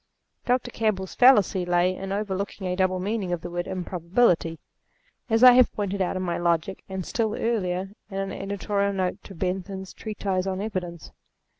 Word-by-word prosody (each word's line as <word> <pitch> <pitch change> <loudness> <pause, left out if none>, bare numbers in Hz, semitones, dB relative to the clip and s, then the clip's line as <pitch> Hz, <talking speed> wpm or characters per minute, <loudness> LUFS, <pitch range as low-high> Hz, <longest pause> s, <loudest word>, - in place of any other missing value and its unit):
Dr. 245 0 +1
Campbell's 200 -5 -1
fallacy 210 -7 +5
lay 175 +1 +2
in 195 +1 -6
overlooking 200 -1 -3
a 180 0 -1
double 185 0 +1
meaning 200 -1 -2
of 175 -2 -2
the 175 - -7
word 175 0 -3
improbability; 180 -1 +1 0.7
as 225 +2 +3
I 250 - +11
have 250 0 +5
pointed 200 -1 -2
out 185 - 0
in 185 - -2
my 175 -2 -2
Logic, 170 +2 0
and, 190 -2 -4
still 220 -2 -1
earlier, 190 -4 -1 0.2
in 195 - -6
an 195 0 -2
editorial 200 0 -1
note 185 -2 -2
to 195 - -10
Bentham's 190 +2 -4
treatise 195 -3 -3
on 190 0 -2
Evidence. 185 -5 -5
190 Hz, 170 wpm, -25 LUFS, 180-205 Hz, 0.7 s, I